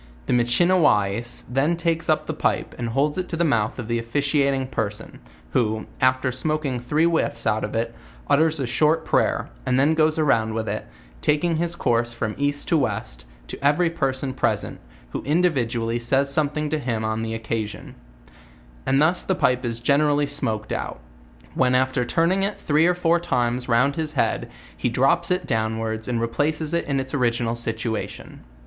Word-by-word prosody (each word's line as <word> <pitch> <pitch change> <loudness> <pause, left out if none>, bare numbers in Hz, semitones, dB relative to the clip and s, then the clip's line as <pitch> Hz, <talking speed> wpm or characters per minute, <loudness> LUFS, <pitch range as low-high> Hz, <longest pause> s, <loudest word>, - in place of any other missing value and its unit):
The - - 0
Michiniwais 120 - +2
then 140 +7 +1
takes 165 -1 -1
up 155 - +2
the - - -3
pipe' - - -1
and 120 -1 -2
holds 145 +7 0
it 180 - -4
to 165 - -3
the 170 - +2
mouth 115 -9 +1
of 120 -4 -5
the 115 0 0
officiating 140 +2 +1
person, 110 -4 -4 0.3
who, 110 -3 0 0.2
after 130 0 +2
smoking 140 0 -1
three 150 +7 +1
whiifs 160 -8 0
out 110 -1 +1
of 105 - -4
it, 115 +1 -1 0.3
utters 160 +1 +3
a 135 - -1
short 155 +6 +2
prayer, - - +1
and 125 - +1
then 145 +4 +4
goes 155 0 +2
around 115 -8 +2
with 110 -1 -2
it, - - -3 0.3
taking 160 +3 +1
his 170 +1 -1
course 120 -6 0
from 110 -2 -3
east 145 0 -1
to 165 - +3
west, - - -3 0.2
to - - -9
every 150 +4 +3
person 135 -4 -2
present, - - -1 0.3
who - - -3
individually 125 -8 0
says 135 +4 +1
something 150 +1 0
to 155 - 0
him 115 -5 -2
on 110 0 -1
the 115 0 -3
oc 115 - -7
casion: 110 -1 -4 0.9
and 135 +1 +3
thus 165 +4 +3
the 190 - -1
pipe 125 -6 +1
is 115 -1 -2
generally 145 +3 +3
smoked 110 -5 -2
out; - - -4 0.5
when 125 0 +2
af 130 +1 +2
ter 125 - +1
turning 170 +9 +2
it 200 +2 -2
three 155 +3 +3
or 180 - +2
four 170 -1 +2
times 125 -5 -1
round 125 +4 +3
his 155 -2 -2
head, 140 - 0 0.3
he - - -1
drops 170 +8 +2
it 180 0 0
downwards 110 -1 -2
and 120 -2 -1
replaces 150 +7 -1
it 170 - 0
in 140 -1 0
its 130 0 -4
original 120 -3 0
situation. 115 -1 -4
130 Hz, 180 wpm, -23 LUFS, 115-155 Hz, 0.9 s, then